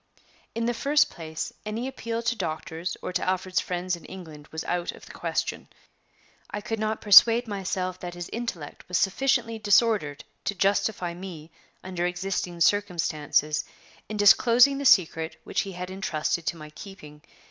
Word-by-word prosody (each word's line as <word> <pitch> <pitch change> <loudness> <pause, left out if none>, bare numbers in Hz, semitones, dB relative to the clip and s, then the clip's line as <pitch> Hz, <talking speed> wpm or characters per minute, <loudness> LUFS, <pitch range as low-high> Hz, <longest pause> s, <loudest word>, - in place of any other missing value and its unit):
In 230 0 -1
the 240 - +1
first 285 +5 +2
place, 160 -2 -6
any 220 +4 -3
appeal 230 -3 -4
to 235 +1 0
doctors 165 -2 -4
or - - -4
to - - 0
Alfred's 185 0 0
friends 180 0 -2
in 170 - -14
England 160 -5 -10
was 160 0 -6
out 175 -1 -2
of - - -14
the - - -12
question. - - -3 0.8
I 205 - -4
could 225 +1 -4
not 215 0 -1
persuade 230 +4 +8
myself 185 -2 -3
that 175 -1 -7
his 175 -1 -6
intellect 220 -11 -5
was 180 - 0
sufficiently 230 +2 +1
disordered 205 -8 +2 0.2
to 200 - -1
justify 195 -2 +1
me, 170 -3 -9 0.3
under 180 -1 -2
existing 180 -1 -3
circumstances, 155 -6 +1 0.5
in 215 - -4
disclosing 240 +6 +6
the 280 - -4
secret 165 -8 +4
which - - -1
he 195 - -6
had 180 +1 -6
intrusted 170 -3 -2
to 170 - -1
my 155 -1 -10
keeping. 150 -4 -12
185 Hz, 160 wpm, -26 LUFS, 170-215 Hz, 0.8 s, persuade